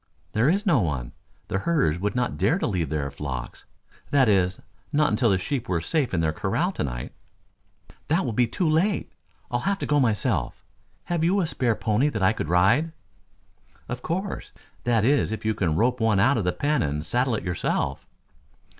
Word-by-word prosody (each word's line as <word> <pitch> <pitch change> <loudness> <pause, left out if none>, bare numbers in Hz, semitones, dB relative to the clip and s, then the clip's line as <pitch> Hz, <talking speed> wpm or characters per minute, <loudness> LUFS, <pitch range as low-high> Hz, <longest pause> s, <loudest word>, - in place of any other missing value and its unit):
"There 115 +6 +3
is 200 +5 +1
no 170 -10 +4
one. 70 - -2 0.4
The 95 - -1
herders 135 - +1
would 105 +4 -2
not 125 -1 0
dare 160 - +2
to 195 - -1
leave 90 - -1
their 70 -2 -2
flocks 70 -3 -6 0.4
that 135 -3 +4
is 95 -3 +2 0.3
not 150 0 +2
until 115 +2 +2
the 95 - +3
sheep 125 +5 -3
were 90 -2 +1
safe 140 - 0
in 85 - 0
their 80 -1 +1
corral 105 - 0
to - - -3
night." - - -4 1.0
"That 165 +3 +1
will 120 - -2
be 120 +2 +3
too 165 +9 -1
late. 170 +6 +1 0.4
I'll 120 - +1
have 195 +9 0
to - - -4
go 145 0 +2
myself. 115 -6 0 0.4
Have 170 -2 -1
you 185 +4 +3
a 180 - +2
spare 125 -7 0
pony 110 +7 +1
that 110 -9 -2
I 100 +3 +4
could 80 - -4
ride!" 115 - +3 0.9
"Of 120 +1 -5
course. 190 +7 -3 0.3
That 115 -3 +2
is 140 -3 +2
if 110 - -5
you 110 - +2
can 85 -7 0
rope 125 +6 +2
one 110 -3 +2
out 130 +7 +4
of 100 - -2
the 90 - +2
pen 150 +9 0
and 75 +1 -2
saddle 125 -1 +1
it - - -4
yourself." 90 -1 -1
115 Hz, 200 wpm, -25 LUFS, 90-150 Hz, 1.0 s, no